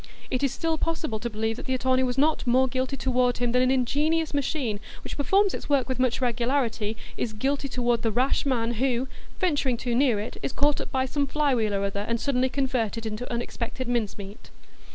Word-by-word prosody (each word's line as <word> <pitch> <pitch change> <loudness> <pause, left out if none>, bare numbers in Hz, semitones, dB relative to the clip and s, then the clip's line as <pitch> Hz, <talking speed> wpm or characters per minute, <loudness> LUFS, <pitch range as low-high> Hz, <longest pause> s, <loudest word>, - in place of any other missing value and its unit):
It 255 - 0
is 275 -2 +2
still 320 +3 -1
possible 320 -9 -1
to 235 - -3
believe 220 +1 -2
that - - -7
the 260 - +1
attorney 260 0 +2
was 255 0 0
not 300 -1 +2
more 260 +2 +4
guilty 260 +2 -2
toward 250 -2 +1
him 245 -1 0
than 250 +1 +3
an 255 - +3
ingenious 295 +5 +1
machine, 275 -6 -1 0.2
which - - -6
performs 390 +8 +3
its - - -6
work 275 -3 +3
with 260 -1 -2
much 255 0 +1
regularity, 235 -3 0 0.2
is 220 - -2
guilty 275 +5 -1
toward 240 -2 +1
the 225 - +1
rash 255 +5 +2
man 240 -4 0
who, 255 +2 0 0.3
venturing 285 -9 +1
too 245 0 -2
near 245 -4 +3
it, 210 - -5
is - - -3
caught 290 0 +2
up - - -6
by 260 0 +1
some 280 +2 -1
fly 295 0 +1
wheel 215 -4 +1
or 195 - 0
other, 200 0 -1
and 235 0 0
suddenly 260 -1 +1
converted 240 -5 -1
into 220 +3 -4
unexpected 240 +1 -4
mince 235 -4 -1
meat. 200 +1 -10
255 Hz, 215 wpm, -26 LUFS, 235-275 Hz, 0.3 s, more